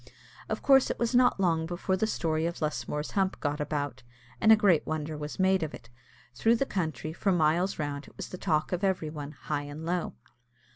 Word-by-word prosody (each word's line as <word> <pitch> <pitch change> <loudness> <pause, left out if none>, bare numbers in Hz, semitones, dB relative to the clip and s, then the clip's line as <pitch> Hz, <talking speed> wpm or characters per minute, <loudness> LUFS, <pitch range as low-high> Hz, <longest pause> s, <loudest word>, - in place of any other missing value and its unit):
Of - - -3
course 270 -1 +5
it - - -2
was 235 +1 0
not 245 -4 +4
long 165 -4 +1
before 175 +2 -1
the 215 +4 0
story 160 -5 0
of 170 - -5
Lusmore's 150 -1 -2
hump 195 -1 0
got 145 +1 -2
about, 145 -3 -3 0.4
and 220 - +6
a - - +10
great 200 -7 +3
wonder 155 0 -3
was 150 0 -6
made 190 0 +3
of 155 -2 -3
it. 115 - -15 0.4
Through 225 - +3
the 275 - 0
country, 160 -7 -3
for 195 +4 0
miles 175 +2 +2
round, 145 -1 -4
it - - -18
was - - -6
the 185 - -8
talk 155 -5 0
of 180 +1 -2
every 185 -5 0
one, 150 -1 -7
high 150 -2 -3
and 145 +2 -7
low. 175 +1 -2
160 Hz, 210 wpm, -29 LUFS, 150-190 Hz, 0.4 s, a